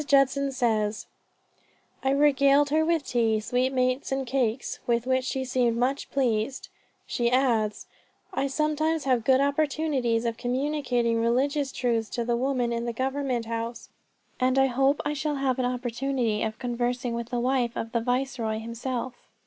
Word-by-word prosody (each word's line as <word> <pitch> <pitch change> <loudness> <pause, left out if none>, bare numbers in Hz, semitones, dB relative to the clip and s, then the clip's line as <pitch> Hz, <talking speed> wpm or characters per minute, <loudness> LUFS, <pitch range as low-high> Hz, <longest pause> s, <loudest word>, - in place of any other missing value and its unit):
Judson 275 0 +3
says, 220 -5 0 1.0
"I 265 - +2
regaled 280 0 +4
her 315 +1 +3
with 325 -3 +1
tea, 225 -4 +1
sweetmeats, 255 +3 0
and 270 0 -1
cakes, 250 -1 -1
with 235 0 +1
which 260 0 +1
she 265 0 -2
seemed 245 -2 +1
much 260 +3 -1
pleased." 250 -1 -1 0.4
She 235 -1 0
adds, 235 -5 +1 0.5
"I 275 - 0
sometimes 305 +2 0
have 250 -3 +1
good 260 +2 +4
opportunities 280 -5 +1
of 230 -1 -1
communicating 245 -2 0
religious 270 +4 +1
truths 230 -3 -1
to 235 - -1
the 240 0 +1
women 250 -1 0
in 235 0 -2
the 235 - -2
government 260 -1 -1
house, 230 +1 -5 0.5
and 255 +1 +2
hope 270 +2 +3
I 295 - 0
shall 295 +1 -2
have 270 -2 0
an 255 - +1
opportunity 245 -2 -1
of 220 0 -2
conversing 245 0 -2
with 235 0 -4
the 245 - -1
wife 245 -1 0
of 225 - -4
the 235 - 0
Viceroy 245 -2 -1
herself." 240 +2 -4
255 Hz, 155 wpm, -26 LUFS, 235-275 Hz, 1.0 s, regaled